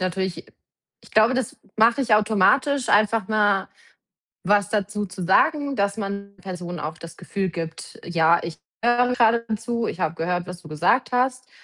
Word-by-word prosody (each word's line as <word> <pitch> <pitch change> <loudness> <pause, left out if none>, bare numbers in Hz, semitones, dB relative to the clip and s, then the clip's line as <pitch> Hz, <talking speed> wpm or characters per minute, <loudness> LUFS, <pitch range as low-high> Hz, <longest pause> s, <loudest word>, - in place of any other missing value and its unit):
natürlich 185 0 -3 0.5
ich - - -20
glaube, 220 +3 +5
das 255 -3 -2 0.2
mach 230 +2 +4
ich 260 -5 0
automatisch, 225 +6 +2
einfach 210 -1 +2
mal 205 -3 +2 0.8
was 205 +1 +2
dazu 210 0 -2
zu 185 0 -8
sagen, 280 - +2
dass 200 -1 0
man 200 -1 -6
Personen 180 -2 -7
auch 155 +2 -5
das 165 +1 -11
Gefühl 195 -2 -3
gibt: 165 -1 -7
„Ja, 170 0 +3
ich 165 -1 -7 0.3
höre 245 +1 +3
grade 230 -1 +3
zu. 235 +1 -3
Ich - - -5
hab 160 -1 -1
gehört, 175 +2 -2
was 180 -1 -8
du 160 - -13
gesagt 175 - +1
hast, 255 +1 0
205 Hz, 165 wpm, -23 LUFS, 180-235 Hz, 0.8 s, glaube